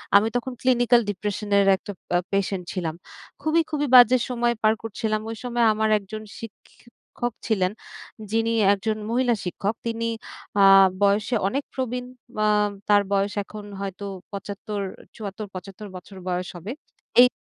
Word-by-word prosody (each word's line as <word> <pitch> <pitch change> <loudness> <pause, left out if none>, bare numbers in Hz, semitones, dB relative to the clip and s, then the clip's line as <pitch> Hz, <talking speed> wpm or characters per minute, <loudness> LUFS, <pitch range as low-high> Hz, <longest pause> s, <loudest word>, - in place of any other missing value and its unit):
আমি 205 +2 +6
তখন 245 +2 -1
ক্লিনিক্যাল 245 -1 +4
ডিপ্রেসান 205 +1 -3
এর 200 - +5
একটা 205 - -8 0.2
পা 175 - +3 0.2
পেশেন্ট 195 -1 0
ছিলাম। 165 -4 -3 0.5
খুবই, 315 +3 +3
খুবই 295 -2 -1
বাজে 250 0 +9
সময় 240 -1 +1
পার 215 0 +4
করছিলাম। 215 -1 -2
ওই 225 - -4
সময় 240 -1 0
আমার 220 0 +1
একজন 215 +2 -8 0.2
শিক্ষক 235 +1 -8
ছিলেন। 190 -5 +1 0.6
যিনি 225 0 +1 0.2
একজন 215 +2 -2
মহিলা 240 0 +2
শিক্ষক। 195 +4 -2
তিনি 230 0 -2 0.6
আ - - +7 0.4
বয়সে 205 +4 +3
অনেক 275 +8 -1
প্রবীণ। 250 -1 -3 0.3
মা 215 - +2 0.4
তার 205 -1 +6
বয়স 200 +1 +1
এখন 210 +1 -9 0.2
হয়তো 195 +1 -5 0.3
৭৫, 200 +1 -5 0.4
৭৪/৭৫ 200 -1 -7
বছর 185 +2 -10
বয়স 180 0 -1
হবে। 175 +6 -6 0.5
এই 250 - +9
215 Hz, 140 wpm, -24 LUFS, 200-240 Hz, 0.6 s, বাজে